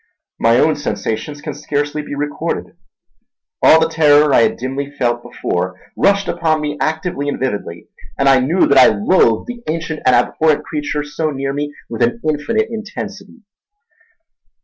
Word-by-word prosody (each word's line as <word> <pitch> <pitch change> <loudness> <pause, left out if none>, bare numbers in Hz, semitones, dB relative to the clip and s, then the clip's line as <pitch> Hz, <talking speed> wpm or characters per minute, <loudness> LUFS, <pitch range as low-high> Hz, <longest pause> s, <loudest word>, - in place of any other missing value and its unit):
My 115 +1 +4
own 155 +4 +3
sensations 145 0 -4
can 150 - -4
scarcely 145 +1 -2
be 145 - -7
recorded. 145 +1 -4 0.9
All 160 - +7
the 160 - +2
terror 150 -2 +4
I - - +6
had - - +1
dimly 135 +3 -4
felt 120 -4 -1
before 95 -6 -3 0.2
rushed 200 0 +2
upon 160 -2 0
me 150 -1 -3
actively 160 -2 -2
and - - -4
vividly, 105 -9 -4 0.3
and 140 - +1
I 135 -1 +6
knew 155 +9 +2
that 140 -1 +5
I - - +8
loathed 110 - +2
the 245 -1 -7
ancient 160 -1 -3
and 130 - +4
abhorrent 150 +5 +2
creature 150 -1 -3
so 150 +2 -3
near 135 -1 -3
me 145 +1 -3 0.2
with 115 +1 -6
an 120 0 +1
infinite 185 +9 0
intensity. 220 +1 -7
145 Hz, 160 wpm, -17 LUFS, 130-160 Hz, 0.9 s, I